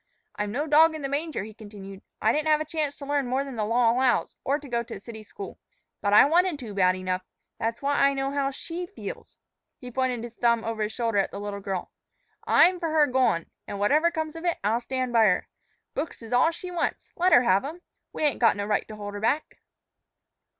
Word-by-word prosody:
"I'm 210 Hz, 0 st, -2 dB
no 285 Hz, +7 st, -1 dB
dog 315 Hz, +1 st, +5 dB
in 310 Hz, -, -6 dB
the 275 Hz, -, -2 dB
manger," 295 Hz, -, -2 dB
he 215 Hz, +1 st, -9 dB
continued; 200 Hz, -2 st, -11 dB, 0.2 s
"I 220 Hz, -, +3 dB
didn't 305 Hz, +1 st, 0 dB
have 305 Hz, -1 st, +4 dB
a 310 Hz, -, -2 dB
chance 305 Hz, -2 st, -2 dB
to 280 Hz, -, -9 dB
learn 285 Hz, -2 st, 0 dB
more 260 Hz, +2 st, 0 dB
than 275 Hz, -2 st, -7 dB
the 220 Hz, -, -1 dB
law 230 Hz, +1 st, +3 dB
allows, 250 Hz, +1 st, +1 dB
or 280 Hz, +2 st, +1 dB
to 295 Hz, -, -11 dB
go 235 Hz, -2 st, 0 dB
to 235 Hz, -, -8 dB
a -, -, -8 dB
city 220 Hz, +1 st, -9 dB
school. 390 Hz, -, -9 dB, 0.4 s
But 205 Hz, -, +1 dB
I 210 Hz, -, +8 dB
wanted 345 Hz, +2 st, +3 dB
to, 235 Hz, -7 st, -8 dB
bad 185 Hz, -2 st, +3 dB
enough. 185 Hz, 0 st, -2 dB, 0.4 s
That's 230 Hz, +3 st, -2 dB
why 285 Hz, +1 st, +1 dB
I 275 Hz, 0 st, +4 dB
know 270 Hz, 0 st, -1 dB
how 280 Hz, -1 st, 0 dB
she 335 Hz, +6 st, -6 dB
feels." 405 Hz, -, -9 dB, 0.4 s
He 250 Hz, -2 st, -9 dB
pointed 250 Hz, -2 st, -1 dB
his 235 Hz, -1 st, -7 dB
thumb 235 Hz, -1 st, +2 dB
over 225 Hz, -1 st, -3 dB
his 210 Hz, 0 st, -1 dB
shoulder 230 Hz, -3 st, 0 dB
at 195 Hz, -, +1 dB
the 200 Hz, -, -7 dB
little 205 Hz, 0 st, -5 dB
girl. 195 Hz, -2 st, -4 dB, 0.6 s
"I'm 360 Hz, 0 st, +5 dB
for 335 Hz, -2 st, -2 dB
her 310 Hz, -1 st, +4 dB
goin'; 255 Hz, -, +1 dB, 0.2 s
an', 200 Hz, -, -5 dB
whatever 295 Hz, +12 st, +3 dB
comes 315 Hz, -2 st, -4 dB
of 330 Hz, -, -7 dB
it, 345 Hz, -1 st, 0 dB
I'll 220 Hz, +3 st, +2 dB
stand 255 Hz, 0 st, -3 dB
by 225 Hz, -1 st, +6 dB
her. 180 Hz, -3 st, +2 dB, 0.5 s
Books 290 Hz, -4 st, -5 dB
is 225 Hz, -, -7 dB
all 250 Hz, +6 st, +5 dB
she 350 Hz, +2 st, -7 dB
wants 345 Hz, -1 st, -2 dB
let 365 Hz, +1 st, +2 dB
her 245 Hz, -, +7 dB
have 195 Hz, -4 st, +3 dB
'em. 325 Hz, +6 st, -7 dB, 0.3 s
We -, -, -4 dB
ain't 295 Hz, -3 st, +2 dB
got 230 Hz, -, +5 dB
no 205 Hz, -, -2 dB
right 210 Hz, -, 0 dB
to 215 Hz, -, -8 dB
hold 205 Hz, -1 st, -7 dB
her 205 Hz, -, -5 dB
back." 285 Hz, +8 st, -1 dB
250 Hz, 240 wpm, -26 LUFS, 215-300 Hz, 0.6 s, I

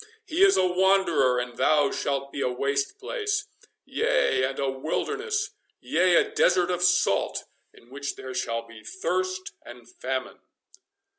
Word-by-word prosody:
He 355 Hz, +1 st, +2 dB
is 390 Hz, -1 st, +6 dB
a 185 Hz, -, +4 dB
wanderer, 180 Hz, -8 st, +3 dB
and 125 Hz, -1 st, -4 dB
thou 145 Hz, -2 st, +3 dB
shalt 140 Hz, 0 st, -2 dB
be 140 Hz, -, -4 dB
a -, -, +1 dB
waste 140 Hz, +2 st, -1 dB
place—yea, 420 Hz, -, -1 dB
and 135 Hz, +1 st, -4 dB
a 140 Hz, -, -1 dB
wilderness—yea, 420 Hz, -, -1 dB
a 420 Hz, -, +3 dB
desert 425 Hz, -, +3 dB
of 175 Hz, -1 st, -2 dB
salt, 180 Hz, -, +2 dB, 0.3 s
in 120 Hz, -, -21 dB
which 140 Hz, +1 st, -5 dB
there 130 Hz, 0 st, -8 dB
shall 115 Hz, -2 st, -2 dB
be 115 Hz, -1 st, -13 dB
thirst 185 Hz, -, -2 dB
and 120 Hz, -1 st, -12 dB
famine." 130 Hz, +1 st, -5 dB
155 Hz, 140 wpm, -26 LUFS, -, 0.3 s, is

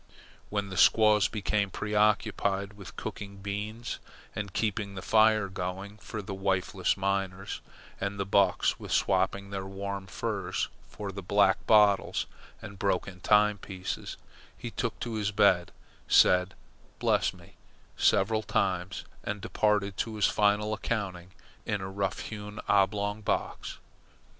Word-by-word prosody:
When 100 Hz, -1 st, -2 dB
the 95 Hz, -, -6 dB
squaws 105 Hz, +1 st, +5 dB
became 105 Hz, -1 st, 0 dB
preoccupied 105 Hz, -1 st, +1 dB
with 100 Hz, -2 st, -11 dB
cooking 100 Hz, -1 st, -6 dB
beans 105 Hz, +4 st, -4 dB, 0.4 s
and 100 Hz, -2 st, -4 dB
keeping 105 Hz, -1 st, -2 dB
the 95 Hz, -, -6 dB
fire 110 Hz, -2 st, +4 dB
going 95 Hz, +2 st, -5 dB
for 105 Hz, 0 st, -6 dB
the 100 Hz, -, -5 dB
wifeless 95 Hz, -1 st, 0 dB
miners, 95 Hz, 0 st, -2 dB, 0.4 s
and 100 Hz, +1 st, -3 dB
the 100 Hz, -, 0 dB
bucks 95 Hz, -1 st, +2 dB
with -, -, -8 dB
swapping 100 Hz, +1 st, +1 dB
their 95 Hz, -1 st, -4 dB
warm 100 Hz, 0 st, -5 dB
furs -, -, -2 dB, 0.2 s
for 100 Hz, -2 st, -6 dB
black 100 Hz, 0 st, +2 dB
bottles 105 Hz, -2 st, +4 dB, 0.4 s
and 100 Hz, -1 st, -9 dB
broken 95 Hz, -2 st, -1 dB
time 105 Hz, +2 st, +4 dB
pieces, 95 Hz, -1 st, -5 dB, 0.4 s
he -, -, -6 dB
took -, -, -3 dB
to 120 Hz, -, -3 dB
his 105 Hz, -1 st, 0 dB
bed, 95 Hz, -4 st, +3 dB, 0.4 s
said 90 Hz, +1 st, +5 dB, 0.4 s
"Bless -, -, +2 dB
me" -, -, -17 dB, 0.4 s
several 110 Hz, +3 st, +3 dB
times, 95 Hz, -3 st, -1 dB, 0.2 s
and 105 Hz, 0 st, -3 dB
departed 100 Hz, -1 st, 0 dB
to 110 Hz, -1 st, -2 dB
his 105 Hz, -, +2 dB
final 105 Hz, +1 st, +2 dB
accounting 95 Hz, -6 st, -3 dB, 0.3 s
in 105 Hz, -, -1 dB
a 95 Hz, -, -5 dB
rough 95 Hz, 0 st, -2 dB
hewn, 105 Hz, -1 st, -7 dB
oblong 100 Hz, +1 st, +2 dB
box. 105 Hz, -, -2 dB
100 Hz, 135 wpm, -29 LUFS, 95-105 Hz, 0.4 s, squaws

